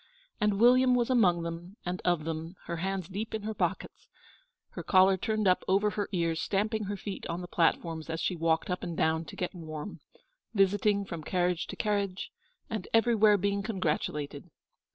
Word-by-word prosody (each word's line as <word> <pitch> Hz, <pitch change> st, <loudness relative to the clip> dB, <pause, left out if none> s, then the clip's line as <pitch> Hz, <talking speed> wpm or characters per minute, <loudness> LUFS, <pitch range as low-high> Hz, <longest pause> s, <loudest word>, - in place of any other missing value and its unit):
And 210 Hz, -1 st, +1 dB
William 250 Hz, +2 st, +6 dB
was 245 Hz, +1 st, +1 dB
among 180 Hz, -9 st, +3 dB
them 170 Hz, +4 st, -7 dB
and 180 Hz, +1 st, -3 dB
of 175 Hz, -3 st, +1 dB
them, 165 Hz, +2 st, -5 dB
her 170 Hz, -, -4 dB
hands 190 Hz, 0 st, -2 dB
deep 205 Hz, +4 st, -4 dB
in 215 Hz, -, -4 dB
her 220 Hz, +1 st, -3 dB
pockets, -, -, -3 dB, 0.6 s
her -, -, -7 dB
collar 190 Hz, 0 st, +5 dB
turned 215 Hz, +1 st, -1 dB
up 185 Hz, -, +3 dB
over 200 Hz, +3 st, +3 dB
her 205 Hz, -1 st, -3 dB
ears, 165 Hz, -3 st, 0 dB
stamping 215 Hz, +2 st, 0 dB
her 205 Hz, +1 st, -3 dB
feet 195 Hz, 0 st, -6 dB
on 170 Hz, 0 st, -3 dB
the 180 Hz, -, -7 dB
platforms 165 Hz, -2 st, 0 dB
as 165 Hz, 0 st, -3 dB
she 180 Hz, +3 st, -1 dB
walked 165 Hz, +1 st, 0 dB
up 180 Hz, -, -2 dB
and 170 Hz, -2 st, -5 dB
down 160 Hz, +1 st, +1 dB
to -, -, -10 dB
get 180 Hz, -, -3 dB
warm, 160 Hz, +1 st, -7 dB, 0.6 s
visiting 200 Hz, +1 st, +3 dB
from 170 Hz, -4 st, -6 dB
carriage 180 Hz, +1 st, 0 dB
to -, -, -6 dB
carriage, 200 Hz, -3 st, -1 dB, 0.4 s
and 215 Hz, -5 st, -4 dB
everywhere 220 Hz, -2 st, +5 dB
being 200 Hz, +1 st, 0 dB
congratulated. 155 Hz, -6 st, -2 dB
185 Hz, 180 wpm, -29 LUFS, 170-210 Hz, 0.6 s, William